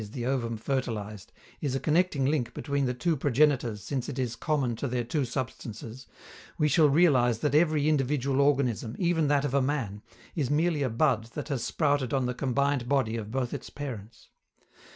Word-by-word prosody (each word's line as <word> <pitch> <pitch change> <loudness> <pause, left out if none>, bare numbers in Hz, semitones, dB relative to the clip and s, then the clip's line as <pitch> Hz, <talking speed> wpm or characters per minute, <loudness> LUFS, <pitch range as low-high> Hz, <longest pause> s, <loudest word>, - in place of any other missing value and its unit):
_ 105 -1 -8
the 120 -2 -4
ovum 120 -3 -1
fertilized) 110 -5 -3 0.3
is 140 -3 -1
a - - 0
connecting 155 -3 +1
link 135 -4 0
between 140 -1 -1
the 125 - 0
two 165 +5 0
progenitors 130 -6 +1
since 130 +4 -3
it 140 - -5
is 125 -3 -2
common 135 -4 0
to 140 - -3
their 125 -1 -1
two 135 +5 -1
substances, 125 -1 -6 0.5
we 150 - +3
shall 150 0 +5
realize 135 -7 +4
that 145 +4 -1
every 155 -1 +3
individual 140 -2 +1
organism, 125 -5 +1
even 170 -4 +1
that 145 0 +2
of 135 - -2
a 140 - +3
man, 130 -7 -2 0.3
is 140 -6 -1
merely 155 +1 +1
a 135 - +1
bud 115 -1 +1
that 150 +1 -5
has 135 -5 -2
sprouted 145 -4 0
on 130 -2 +1
the 125 - -1
combined 135 0 0
body 130 -5 +1
of 110 -2 -5
both 125 +1 -2
its - - -6
parents. 115 -6 -8
135 Hz, 190 wpm, -28 LUFS, 120-145 Hz, 0.5 s, shall